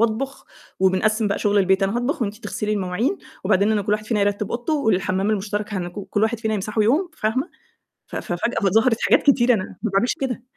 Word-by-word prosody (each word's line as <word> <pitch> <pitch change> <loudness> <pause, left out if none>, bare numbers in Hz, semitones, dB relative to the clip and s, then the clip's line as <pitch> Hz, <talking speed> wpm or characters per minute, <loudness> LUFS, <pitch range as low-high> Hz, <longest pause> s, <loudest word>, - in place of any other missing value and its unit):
وأطبُخ 230 +4 -1 0.4
وبنقسّم 210 +3 +2
بقى 200 - -1
شُغل 205 0 +2
البيت، 190 0 +3
"أنا 195 +4 +1
هاطبخ 255 +4 -1
وأنتِ 205 -1 -3
تغسلي 215 -1 -3
المواعين 205 - -1 0.3
وبعدين 200 +2 +3
أنا 210 -1 +1
كل 205 +1 -1
واحد 210 0 -1
فينا 220 -3 0
يرتِّب 205 0 0
أوضته 240 +6 -2
والحَمّام 195 -6 +1
المشترك 210 0 -2
هنك 175 -2 -3 0.2
كل 205 - 0
واحد 225 +1 +1
فينا 220 -1 -1
يمسحه 210 +2 -1
يوم." 305 - +2
فاهمة، 255 +10 -1 0.6
ف - - -8
ففجأة 195 +3 -1
ظهرت 225 +3 +3
حاجات - - +4
كتيرة 250 -3 +4
أنا 190 -4 -1 0.2
ما 225 - -1
باعملش 195 +6 +1
كده. 250 -3 -2
215 Hz, 200 wpm, -22 LUFS, 200-235 Hz, 0.6 s, حاجات